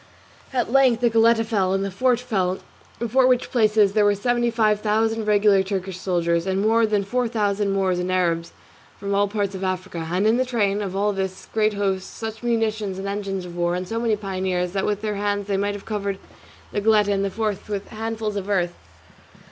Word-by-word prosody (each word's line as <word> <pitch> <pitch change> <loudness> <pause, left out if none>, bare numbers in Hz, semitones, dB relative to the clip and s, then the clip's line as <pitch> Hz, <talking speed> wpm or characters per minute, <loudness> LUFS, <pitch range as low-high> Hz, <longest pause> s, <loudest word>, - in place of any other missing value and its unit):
At 245 -3 -1
length 260 -3 +4
the 240 -1 +3
Goletta 225 0 +4
fell, 195 -4 +1
and 195 0 0
the 195 - -4
fort 245 +5 +2
fell, 190 -7 -1 0.4
before 250 +3 +2
which 255 -1 +1
places 215 -4 +3
there 210 -1 +3
were 205 0 +4
seventy 240 +3 +1
five 215 -3 +2
thousand 220 +1 0
regular 205 -1 +4
Turkish 190 -1 -4
soldiers, 170 -2 0
and 190 0 0
more 225 +2 +3
than 210 -2 +1
four 245 +6 -1
hundred 240 -1 -3
thousand 205 -2 0
Moors 190 -2 +1
and 180 +1 -2
Arabs 170 -2 0 0.5
from 200 0 -3
all 200 +1 +3
parts 200 -1 -2
of 190 0 -6
Africa, 185 -3 -3
and 185 +3 +1
in 220 +2 +4
the 255 - +2
train 210 -5 0
of 195 -2 -4
all 205 +1 +1
this 190 -1 -4
great 215 -1 +2
host 195 -2 -2
such 220 -1 -6
munitions 220 -4 -1
and 195 +1 -5
engines 200 -2 -3
of 175 -1 -9
war, 175 0 0
and 180 0 -4
so 225 +4 -2
many 230 -2 +1
pioneers 185 -3 -2
that 195 0 -1
with 210 0 -2
their 210 -2 -2
hands 205 0 -1
they 200 -1 -1
might 205 +1 -1
have 205 - -9
covered 200 -2 -3 0.5
the 205 - -1
Goletta 210 -1 +3
and 195 -1 +1
the 200 - 0
fort 215 -1 -3
with 200 -1 -4
handfuls 220 -1 -4
of 200 0 -5
earth. 175 -3 +1
205 Hz, 215 wpm, -23 LUFS, 190-220 Hz, 0.5 s, length